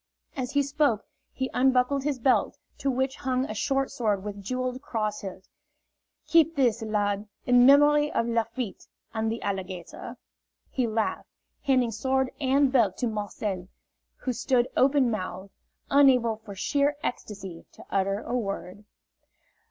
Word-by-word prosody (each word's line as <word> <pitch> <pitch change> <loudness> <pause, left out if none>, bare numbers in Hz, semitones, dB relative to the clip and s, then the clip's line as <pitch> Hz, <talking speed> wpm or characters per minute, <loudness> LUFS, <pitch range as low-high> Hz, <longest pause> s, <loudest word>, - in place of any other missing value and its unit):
As 255 -3 -3
he 285 0 +3
spoke 280 -6 +1 0.3
he 260 -1 -3
unbuckled 260 +1 +3
his 290 -3 0
belt, 255 +1 +2 0.2
to 275 - 0
which 265 +1 -1
hung 260 -1 0
a 215 - -5
short 270 +5 0
sword 210 -5 0
with 205 -1 -6
jeweled 255 +4 -3
cross 215 -5 -2
hilt. 190 -1 -8 0.8
"Keep 330 -1 +4
this 245 -5 +2
lad, 205 -1 -1 0.2
in 245 0 +6
memory 295 +1 +6
of 230 - 0
Lafitte 230 -1 -2 0.3
and 220 -1 -1
the 230 - -4
alligator," 190 -3 -5 0.5
he 255 -3 0
laughed, 220 0 -2 0.3
handing 255 -4 +2
sword 260 +4 0
and 270 0 +3
belt 220 -8 +3
to - - -1
Marcel, 205 -4 -3 0.5
who 255 - -3
stood 245 +1 +1
open 265 -2 +4
mouthed, 190 -2 -5 0.4
unable 255 -5 +5
for 215 -2 -11
sheer 285 +8 +1
ecstasy 195 -7 -6
to - - -14
utter 195 +1 0
a 245 - -3
word. 200 -3 -4
240 Hz, 145 wpm, -27 LUFS, 210-265 Hz, 0.8 s, in